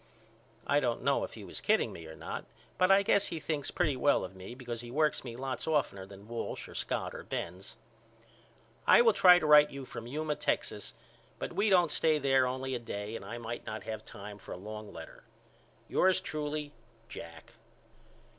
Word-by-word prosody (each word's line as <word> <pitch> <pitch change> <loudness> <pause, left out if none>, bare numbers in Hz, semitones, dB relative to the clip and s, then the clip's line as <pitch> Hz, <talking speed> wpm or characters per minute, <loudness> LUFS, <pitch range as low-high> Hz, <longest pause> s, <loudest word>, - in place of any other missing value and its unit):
I 145 - +3
don't 120 -4 -1
know - - +2
if - - -6
he - - -9
was - - -7
kidding - - +2
me 80 -1 -9
or 80 - -9
not - - -6 0.3
but 185 - +5
I 195 +1 +6
guess 200 0 +3
he 165 - -4
thinks 150 -2 -2
pretty 155 -6 +1
well 140 -2 +3
of 95 +1 -11
me 95 +5 -9
because 120 -3 -5
he 120 - -9
works 150 +4 +1
me 120 -3 -7
lots 130 +1 -4
oftener 135 -11 0
than 100 +1 -13
Walsh 115 0 -4
or - - -11
Scott - - -2
or - - -6
Benz. 90 +3 -6 1.1
I - - +8
will 225 -2 +6
try 180 -2 +8
to 175 - -1
write 150 0 +8
you 140 -1 -7
from 115 -2 -8
Yuma, 150 +3 -2
Texas, - - -2 0.4
but - - -5
we 210 +1 +2
don't 175 -5 +5
stay 155 -1 +3
there 135 -2 +3
only 130 +1 -3
a 125 - -1
day 105 -2 -5
and 115 - -6
I 110 +5 -6
may 120 0 -5
not 110 0 -5
have 110 -1 -5
time 105 0 -9
for - - -8
a - - -6
long 105 +2 -8
letter. - - -11 0.6
Yours 185 0 +3
truly, 150 -3 -4 0.4
JACK. 85 -9 -10
130 Hz, 200 wpm, -31 LUFS, 110-155 Hz, 1.1 s, I